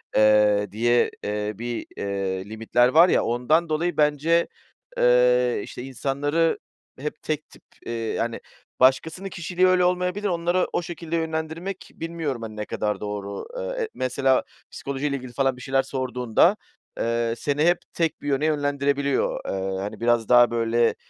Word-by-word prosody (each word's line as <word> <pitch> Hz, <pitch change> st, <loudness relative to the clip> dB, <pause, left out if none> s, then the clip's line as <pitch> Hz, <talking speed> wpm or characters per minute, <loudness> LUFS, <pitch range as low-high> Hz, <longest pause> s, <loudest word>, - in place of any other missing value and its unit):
Eee, 105 Hz, -2 st, +4 dB
diye, 120 Hz, +3 st, +2 dB
eee, 105 Hz, 0 st, -2 dB
bir, 120 Hz, 0 st, -4 dB
eee, 95 Hz, -1 st, -2 dB
limitler 115 Hz, +3 st, +2 dB
var 165 Hz, +7 st, +6 dB
ya, -, -, +3 dB
ondan 150 Hz, +8 st, +1 dB
dolayı 165 Hz, +3 st, -1 dB
bence, 150 Hz, +3 st, +3 dB, 0.5 s
eee, 125 Hz, 0 st, +4 dB
işte, 125 Hz, -, -8 dB
insanları 145 Hz, +5 st, 0 dB, 0.4 s
hep 150 Hz, +2 st, -5 dB
tek 155 Hz, -1 st, -3 dB
tip, -, -, -18 dB, 0.2 s
eee, -, -, -5 dB
yani 115 Hz, -1 st, -2 dB, 0.4 s
başkasının 160 Hz, +9 st, +2 dB
kişiliği 180 Hz, +1 st, +1 dB
öyle 185 Hz, -1 st, +4 dB
olmayabilir. 180 Hz, +3 st, 0 dB
Onları 175 Hz, 0 st, +1 dB
o -, -, +1 dB
şekilde 170 Hz, -1 st, -5 dB
yönlendirmek 160 Hz, +3 st, -4 dB
bilmiyorum, 165 Hz, -7 st, -4 dB
hani, 110 Hz, -1 st, -7 dB
ne 105 Hz, 0 st, -4 dB
kadar 105 Hz, 0 st, -2 dB
doğru. 100 Hz, -1 st, -5 dB
Iıı, -, -, -4 dB
e 445 Hz, -, -4 dB
mesela 130 Hz, +1 st, +1 dB, 0.3 s
psikolojiyle 140 Hz, +1 st, -3 dB
ilgili 130 Hz, -2 st, -7 dB
falan 135 Hz, +1 st, +1 dB
bir -, -, -11 dB
şeyler 135 Hz, +1 st, +1 dB
sorduğunda, 130 Hz, -, +1 dB, 0.4 s
eee, 115 Hz, 0 st, 0 dB
seni 145 Hz, +4 st, 0 dB
hep 175 Hz, 0 st, +4 dB, 0.2 s
tek 165 Hz, -2 st, -1 dB
bir -, -, -7 dB
yöne 140 Hz, +1 st, +1 dB
yönlendirebiliyor. 140 Hz, -2 st, 0 dB
Eee, 95 Hz, 0 st, -2 dB
hani 100 Hz, +1 st, -5 dB
biraz 120 Hz, -1 st, +1 dB
daha 120 Hz, -1 st, +6 dB
böyle 115 Hz, 0 st, +2 dB
135 Hz, 150 wpm, -24 LUFS, 115-160 Hz, 0.5 s, var